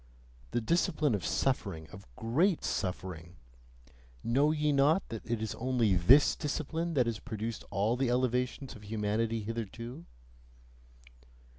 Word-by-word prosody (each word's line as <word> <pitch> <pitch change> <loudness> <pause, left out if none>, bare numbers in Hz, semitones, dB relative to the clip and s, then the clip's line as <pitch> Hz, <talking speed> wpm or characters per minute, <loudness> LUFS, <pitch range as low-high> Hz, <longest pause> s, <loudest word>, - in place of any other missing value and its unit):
The 120 - -1
discipline 155 +1 +1
of 100 -5 -1
suffering, 80 -1 -1
of 100 - -12
GREAT 155 - +1
suffering 90 -2 -3 0.9
know 140 +6 +3
ye 150 -1 +1
not 145 +6 +3
that 115 -2 -6
it 115 -2 -1
is 110 - -3
only 120 -4 +1
THIS 110 +12 +6
discipline 160 +3 -2
that 125 -3 +4
has 115 -2 -2
produced 110 -2 -5
all 105 +5 +1
the 130 0 0
elevations 125 +1 0
of 105 -1 -12
humanity 110 +1 -1
hitherto? 115 -2 -6
115 Hz, 130 wpm, -31 LUFS, 105-135 Hz, 0.9 s, THIS